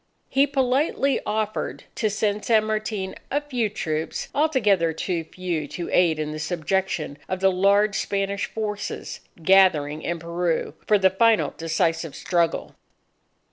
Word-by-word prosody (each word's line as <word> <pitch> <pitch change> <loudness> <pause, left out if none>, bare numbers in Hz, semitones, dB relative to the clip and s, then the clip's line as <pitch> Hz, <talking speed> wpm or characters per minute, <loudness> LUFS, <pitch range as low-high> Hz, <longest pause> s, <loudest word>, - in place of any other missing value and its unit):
He 275 +2 +3
politely 275 +1 +1
offered 215 0 -2
to 220 - +1
lend 210 0 +1
San 220 -2 +4
Martin 215 -3 -2 0.2
a 285 - +1
few 250 -7 -2
troops, 160 -6 -3
altogether 210 - +2
too 170 +1 -2
few 170 -4 -3
to 170 +4 -6
aid 170 -3 +3
in 155 0 -3
the 155 - -5
subjection 175 -2 -2
of 185 - -2
the 190 0 +4
large 200 +3 +3
Spanish 200 0 -1
forces 210 -2 -4 0.2
gathering 160 -6 +4
in 170 +1 -2
Peru 170 0 -2
for 210 - +5
the 190 -1 +4
final 225 +2 +3
decisive 165 -1 -1
struggle. 170 -2 0
190 Hz, 140 wpm, -24 LUFS, 165-215 Hz, 0.2 s, for